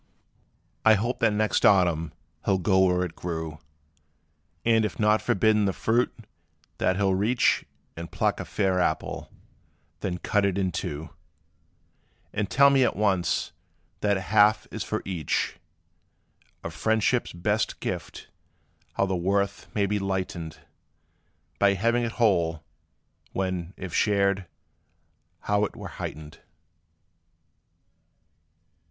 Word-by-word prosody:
I 110 0 +7
hope 120 +5 -2
that 115 - +3
next 105 0 +1
autumn 85 -5 +4 0.3
he - - -3
'll 95 - +4
go 95 +1 +2
where 90 0 +2
it 90 -2 -5
grew, 80 -3 -5 1.1
And, 115 -1 +4
if 105 - -3
not 105 0 +3
forbidden 105 +1 +2
the 95 - +1
fruit, 120 +6 +1 0.7
that 95 - +2
he 100 - 0
'll 95 -1 +3
reach 110 +6 +2 0.3
And 85 0 -7
pluck - - 0
a - - -4
fair 95 -3 0
apple, 80 -3 -1 0.7
then 90 -2 -3
cut 105 +3 0
it 100 -1 +1
in 95 -2 0
two, 75 -1 -5 1.2
And 105 -1 -1
tell 140 +1 +6
me 135 -1 +4
at - - +1
once 95 -4 +1 0.5
that 100 -1 +2
a - - -4
half 105 +3 +3
is - - -4
for - - -3
each. 90 -6 -2 1.1
Of 85 - -5
friendship's 110 +6 +1
best 105 +5 -1
gift - - -5 0.7
how - - +1
the 95 -1 -1
worth 100 +3 -1
may 100 -2 +2
be 105 +1 0
lightened 95 -4 -4 1.0
By 100 0 +4
having 115 +5 +1
it 115 -1 -2
whole, 85 -8 +1 0.7
when, 95 -1 -3
if 95 -3 -7
shared, 100 -2 +2 0.9
how 105 0 +1
't - - -2
were - - -7
heightened! 75 0 -7
100 Hz, 130 wpm, -26 LUFS, 90-105 Hz, 1.2 s, I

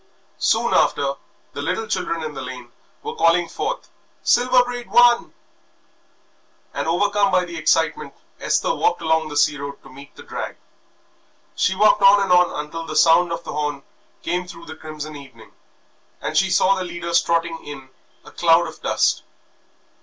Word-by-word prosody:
Soon - - +1
after 140 -1 +2 0.4
the 145 - -5
little 180 +9 -2
children 180 -5 -3
in 155 -1 -5
the 135 - -7
lane 125 -2 -9 0.3
were - - -5
calling 170 +1 +3
forth - - -5 0.3
"Silver 250 +1 +4
Braid 245 -2 -7
won!" 240 +2 +4 1.4
And - - -3
overcome 200 +4 +1
by 185 -1 +2
the 170 -1 -9
excitement 160 0 0 0.2
Esther - - 0
walked 440 - 0
along 160 -1 +1
the 145 - -5
sea 145 -1 +2
road 140 0 -6
to - - -15
meet 140 +2 -14
the - - -12
drag. - - -6 1.0
She 190 - 0
walked 210 +1 +4
on 200 +1 +7
and 195 -2 -1
on 180 -4 +3
until 165 +2 -7
the 155 - -6
sound 170 +2 +4
of 170 - -4
the - - -7
horn 145 -2 -3 0.4
came 180 +1 -2
through 170 -1 -11
the 160 0 -9
crimson 155 -1 -8
evening 130 -6 -14 0.7
and - - -5
she 195 -1 +3
saw 190 +1 +3
the 190 -1 -3
leaders 170 -1 0
trotting 165 0 -1
in 135 -3 -10 0.3
a - - -13
cloud 170 0 +3
of - - -11
dust. - - +1
170 Hz, 170 wpm, -21 LUFS, 150-190 Hz, 1.4 s, on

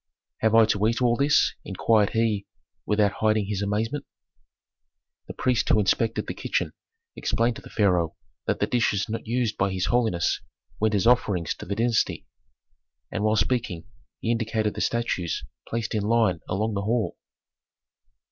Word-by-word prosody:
"Have 110 0 +2
I 115 -1 +8
to 105 0 +1
eat 115 0 0
all 120 -2 +3
this?" 145 +3 +3
inquired 105 +1 +2
he, 110 -3 0 0.4
without 105 -1 +3
hiding 110 -1 +2
his 100 -1 -3
amazement. 110 +8 -1 1.2
The - - -8
priest 125 -2 +1
who 110 - +5
inspected 105 +3 +1
the - - -4
kitchen - - -2 0.4
explained 115 0 0
to - - -10
the - - -13
pharaoh 90 -6 +1 0.3
that - - 0
the - - +2
dishes 110 -4 +1
not 115 0 -5
used 115 -2 -1
by 95 0 +2
his 95 -1 -1
holiness 110 -9 +1 0.4
went 110 0 +2
as 100 - +1
offerings 100 -8 +2
to - - -10
the 100 - -2
dynasty. 115 +1 0 0.9
And 105 - -2
while 110 0 +3
speaking 110 -5 0 0.4
he 115 - 0
indicated 115 -2 0
the - - -4
statues 115 -8 -1 0.3
placed 115 0 -2
in 110 - 0
line 110 -4 +2
along 105 +3 0
the 100 - -1
hall. 110 +2 0
110 Hz, 160 wpm, -25 LUFS, 100-115 Hz, 1.2 s, I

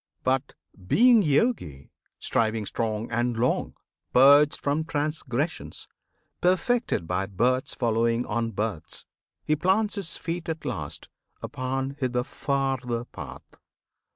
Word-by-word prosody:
But, 130 +1 0 0.3
being 240 - +6
Yogi, 145 - 0 0.3
striving 110 -1 0
strong 110 +1 -2
and 120 +1 0
long, 120 +2 0 0.4
Purged 145 +3 +7
from 145 +2 0
transgressions, 150 -1 -3 0.5
perfected 185 - +1
by 90 +2 -1
births 125 +7 0
Following 115 0 +1
on 115 +1 -1
births, 105 -6 -3 0.4
he 155 - +2
plants 195 +7 +2
his 195 -6 -5
feet 170 0 -4
at 160 -1 -4
last 75 - -5 0.4
Upon 135 +2 -3
the 125 -2 0
farther 130 -4 -2
path. 70 - -11
130 Hz, 110 wpm, -26 LUFS, 115-155 Hz, 0.5 s, Purged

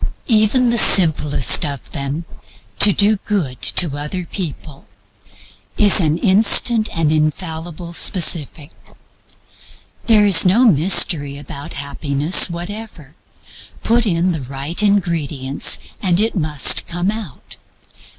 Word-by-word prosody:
Even 235 +2 +1
the 235 - +1
simplest 150 - +3
of 140 -4 -7
them 140 +4 -5 0.5
to 205 - +6
do 205 +2 +1
good 180 -11 -5
to 165 -6 +1
other 170 +5 -5
people 155 -6 -8 0.9
is 205 -2 +4
an 160 -3 0
instant 215 +4 +2
and 160 -2 0
infallible 160 +2 -4
specific. 160 -4 0 1.4
There 215 -3 +3
is 190 -5 +5
no 205 +8 +2
mystery 155 - +2
about 140 0 -9
Happiness 140 +4 +1
whatever. 175 -3 -10 0.7
Put 230 0 0
in 175 0 -1
the 160 -4 -5
right 135 +7 -4
ingredients 165 -9 -1 0.2
and 180 -3 0
it 220 +2 -1
must 150 -6 +1
come 175 +3 -3
out. 210 - -10
170 Hz, 110 wpm, -16 LUFS, 145-205 Hz, 1.4 s, to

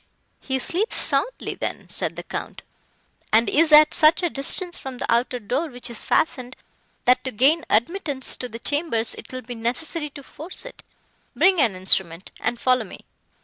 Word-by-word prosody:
"He 265 -1 -2
sleeps 365 - 0
soundly - - -1
then," - - -5
said - - -2
the - - -7
Count, - - -7 0.7
"and 225 +2 +4
is 320 +1 +2
at 305 0 +7
such 315 +4 +5
a 345 - 0
distance 345 +6 +3
from 265 -2 -8
the - - -3
outer 245 +2 0
door, 250 +8 -2
which 245 -2 -7
is 230 - -4
fastened, 255 -4 0 0.5
that 250 +1 +4
to 260 - -3
gain 285 +9 +3
admittance 280 - 0
to 250 - -5
the 230 - -7
chambers 285 -3 0
it - - -11
will 255 0 -6
be 245 - -7
necessary 275 +7 -3
to 280 0 -12
force 320 - -6
it. - - -11 0.5
Bring 375 -4 +4
an 225 -8 +2
instrument, 185 -1 +1
and 240 0 -2
follow 255 -2 +2
me." 190 - -12
260 Hz, 180 wpm, -23 LUFS, 235-315 Hz, 0.7 s, at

